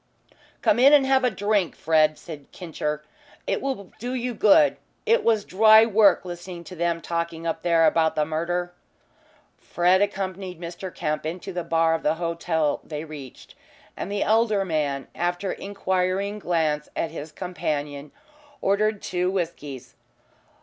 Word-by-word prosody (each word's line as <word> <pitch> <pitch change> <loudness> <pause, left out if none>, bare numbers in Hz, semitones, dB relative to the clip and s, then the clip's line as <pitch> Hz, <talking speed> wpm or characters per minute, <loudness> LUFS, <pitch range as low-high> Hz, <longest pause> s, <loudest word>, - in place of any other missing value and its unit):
"Come 210 - +3
in 275 +3 +7
and 285 -2 +6
have 265 0 +3
a 250 - +4
drink, 205 -3 0
Fred," 155 -1 +2
said 150 -4 -11
"Kincher." 150 -3 -4 0.4
"It - - -1
will 260 -9 -4
do 245 +3 -4
you 250 0 -2
good. 235 +8 +5 0.3
It 460 +1 +3
was 220 -3 +2
dry 220 +3 +6
work 210 -4 +4
listening 175 0 -7
to 180 - -10
them 170 0 -1
talking 170 -1 -3
up 165 - -2
there 165 -2 +3
about 160 -1 +2
the 150 - +1
murder." 175 +3 -2 0.9
Fred 180 +2 +2
accompanied 190 -3 -3
Mr. 175 +2 -7
Kemp 155 -3 -3
into 175 +4 -5
the 175 -1 -3
bar 165 0 +2
of 165 - -1
the 155 - +1
hotel 165 -2 -1
they 150 -1 -6
reached, 145 -5 -11 0.4
and 200 - -5
the 205 0 0
elder 215 -2 +2
man, 145 -5 -2
after 175 +2 -2
an - - -8
inquiring 195 +1 -1
glance 160 -5 -1
at 165 - -2
his 150 +2 -7
companion, 150 -5 -4 0.5
ordered 210 0 +1
two 180 0 -1
whiskies. 150 -8 -5
175 Hz, 155 wpm, -24 LUFS, 160-200 Hz, 0.9 s, in